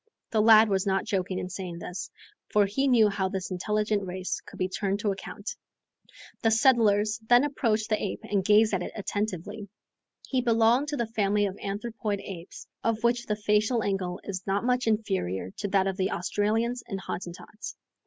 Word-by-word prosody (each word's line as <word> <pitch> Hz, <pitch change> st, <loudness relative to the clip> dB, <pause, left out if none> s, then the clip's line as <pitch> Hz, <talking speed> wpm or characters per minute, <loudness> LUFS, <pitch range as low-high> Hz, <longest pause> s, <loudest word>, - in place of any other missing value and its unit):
The 220 Hz, -, +3 dB
lad 220 Hz, 0 st, +8 dB
was 195 Hz, 0 st, 0 dB
not 195 Hz, 0 st, +1 dB
joking 190 Hz, -3 st, -1 dB
in 180 Hz, -, -3 dB
saying 180 Hz, -3 st, -5 dB
this, 180 Hz, +1 st, -6 dB, 0.4 s
for 210 Hz, -1 st, +4 dB
he 270 Hz, +8 st, 0 dB
knew 235 Hz, -5 st, +5 dB
how 195 Hz, -2 st, -1 dB
this 190 Hz, 0 st, -4 dB
intelligent 210 Hz, +2 st, 0 dB
race 185 Hz, 0 st, -4 dB
could -, -, -11 dB
be 185 Hz, -, 0 dB
turned 195 Hz, +1 st, -2 dB
to 210 Hz, -3 st, +1 dB
account. 195 Hz, -, -6 dB, 0.9 s
The 225 Hz, -, +3 dB
settlers 220 Hz, -2 st, +4 dB
then 245 Hz, +2 st, +7 dB
approached 225 Hz, -7 st, 0 dB
the 215 Hz, -, 0 dB
ape 205 Hz, -, -3 dB
and 200 Hz, -2 st, 0 dB
gazed 210 Hz, +2 st, +5 dB
at 190 Hz, -, +1 dB
it -, -, -5 dB
attentively. 205 Hz, 0 st, -4 dB, 0.6 s
He 260 Hz, -2 st, +1 dB
belonged 235 Hz, +3 st, +3 dB
to 295 Hz, 0 st, -2 dB
the 235 Hz, -, 0 dB
family 210 Hz, -2 st, +1 dB
of 195 Hz, -1 st, -3 dB
anthropoid 210 Hz, 0 st, -3 dB
apes, 180 Hz, -3 st, -9 dB, 0.2 s
of 230 Hz, 0 st, 0 dB
which 240 Hz, 0 st, +1 dB
the 210 Hz, -, 0 dB
facial 210 Hz, +3 st, +1 dB
angle 190 Hz, -2 st, -2 dB
is 190 Hz, -2 st, -4 dB
not 200 Hz, +3 st, 0 dB
much 250 Hz, -1 st, +1 dB
inferior 190 Hz, -, -1 dB
to -, -, -2 dB
that 195 Hz, -1 st, +2 dB
of 190 Hz, -1 st, -2 dB
the 190 Hz, -1 st, +1 dB
Australians 220 Hz, +6 st, 0 dB
and 195 Hz, -4 st, -4 dB
Hottentots. 185 Hz, +3 st, -7 dB
210 Hz, 185 wpm, -27 LUFS, 195-225 Hz, 0.9 s, lad